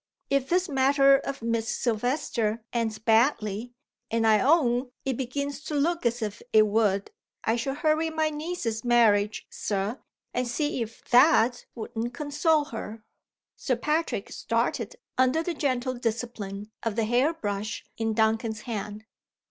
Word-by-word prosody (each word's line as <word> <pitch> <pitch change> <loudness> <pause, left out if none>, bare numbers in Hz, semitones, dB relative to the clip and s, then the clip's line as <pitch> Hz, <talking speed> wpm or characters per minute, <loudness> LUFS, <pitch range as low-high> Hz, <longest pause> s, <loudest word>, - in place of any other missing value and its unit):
If 275 -1 +1
this 360 +2 +2
matter 275 -1 +5
of 275 -3 -6
Miss 230 -1 -1
Silvester 230 -2 -1
ends 225 -2 -1
badly 225 -1 +1 0.4
and 225 0 +1
I 215 -1 +5
own 255 -2 +3 0.2
it 265 -2 0
begins 280 +3 -3
to 300 - -3
look 325 -1 +1
as 235 0 -2
if 210 -1 -4
it 215 -1 +6
would 205 -2 +1 0.3
I 225 - +2
should 270 +4 -2
hurry 315 +1 +2
my 315 -1 0
niece's 300 -8 -3
marriage, 215 -4 +3
Sir, 205 +4 -2 0.3
and 250 0 -1
see 290 +2 -1
if 230 0 -6
that 250 -2 +5
wouldn't 235 +1 -4
console 300 +2 +1
her." 220 0 -6 0.5
Sir 255 - -1
Patrick 305 +7 -1
started - - -1 0.2
under 260 +5 +3
the 350 - -2
gentle 255 -4 -1
discipline 220 -4 -4
of 225 -3 -2
the 225 -1 +1
hair 245 +7 +3
brush 210 -8 -4
in 225 -1 -1
Duncan's 220 0 +1
hand. 210 -2 -5
240 Hz, 145 wpm, -27 LUFS, 220-280 Hz, 0.5 s, it